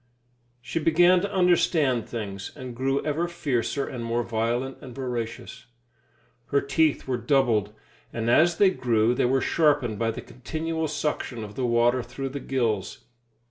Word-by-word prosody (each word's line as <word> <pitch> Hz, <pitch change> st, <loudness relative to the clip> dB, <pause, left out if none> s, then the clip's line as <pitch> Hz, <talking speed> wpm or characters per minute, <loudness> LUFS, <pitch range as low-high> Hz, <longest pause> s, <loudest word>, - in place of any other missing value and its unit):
She 165 Hz, -, -2 dB
began 175 Hz, +3 st, +4 dB
to 200 Hz, +1 st, -3 dB
understand 165 Hz, -, +2 dB
things, 100 Hz, -4 st, -5 dB
and 130 Hz, -4 st, -8 dB
grew 135 Hz, +3 st, -1 dB
ever 155 Hz, +3 st, 0 dB
fiercer 140 Hz, -5 st, -1 dB
and 125 Hz, -3 st, -5 dB
more 115 Hz, +1 st, -1 dB
violent 120 Hz, +3 st, -2 dB
and 125 Hz, -3 st, -10 dB
voracious. 120 Hz, -4 st, -5 dB, 0.8 s
Her 140 Hz, -, +2 dB
teeth 150 Hz, +2 st, +1 dB
were 130 Hz, -2 st, 0 dB
doubled, 120 Hz, -5 st, +2 dB, 0.4 s
and 115 Hz, -1 st, -3 dB
as 165 Hz, +8 st, +4 dB
they 195 Hz, -2 st, +5 dB
grew 115 Hz, -7 st, +2 dB
they 125 Hz, -, +1 dB
were 130 Hz, +2 st, +2 dB
sharpened 145 Hz, -9 st, +2 dB
by 115 Hz, -1 st, +1 dB
the 115 Hz, -, -4 dB
continual 160 Hz, +5 st, -4 dB
suction 150 Hz, -6 st, -3 dB
of 105 Hz, -1 st, -8 dB
the 125 Hz, +2 st, -1 dB
water 120 Hz, +2 st, +3 dB
through 125 Hz, +3 st, -6 dB
the 140 Hz, +2 st, -5 dB
gills. 115 Hz, -8 st, -2 dB
130 Hz, 155 wpm, -25 LUFS, 115-155 Hz, 0.8 s, they